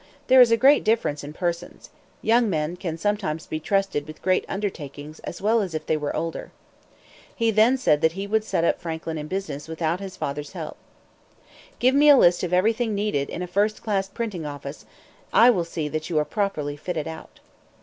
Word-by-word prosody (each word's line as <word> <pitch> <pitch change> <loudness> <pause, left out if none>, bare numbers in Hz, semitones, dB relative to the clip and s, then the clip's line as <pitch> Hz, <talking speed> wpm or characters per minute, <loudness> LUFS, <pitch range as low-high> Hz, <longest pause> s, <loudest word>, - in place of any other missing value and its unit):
There 260 -1 +7
is 240 -2 +6
a 230 - +5
great 275 +5 +5
difference 215 -10 0
in 145 - -7
persons. 170 +1 -4 0.3
Young 230 0 +3
men 155 -1 -1
can 170 -3 -5
sometimes 195 -4 -2
be 155 - -4
trusted 195 -4 -1
with 155 - -11
great 185 0 +2
undertakings 155 -7 -5
as 175 - -8
well 225 +2 +3
as 185 -5 -4
if 155 0 -4
they - - +1
were 150 -1 -3
older." 165 +1 -4 0.9
He 230 -1 +2
then 220 +5 +4
said 150 - +2
that 160 0 +3
he 195 +2 -4
would 215 +1 +1
set 170 -5 0
Franklin 160 -1 -4
up - - -4
in 150 - -7
business 160 -6 -4
without 160 +1 -2
his 195 -2 -8
father's 145 +2 -4
help. 165 -5 -6 1.0
"Give 255 +1 +3
me 295 +2 +6
a 285 - +9
list 175 -6 +5
of 180 - -3
everything 220 +4 +2
needed 200 -9 -1
in 180 - -4
a - - -2
first 205 +4 0
class 195 -3 -1
printing 200 -5 -4
office. 145 -1 -7 0.5
I 240 +2 +7
will 180 -7 0
see 160 -2 -4
that 155 +1 -4
you 165 - -1
are 150 - +2
properly 150 -5 -2
fitted 160 0 -4
out." 160 0 -9
180 Hz, 200 wpm, -24 LUFS, 155-210 Hz, 1.0 s, a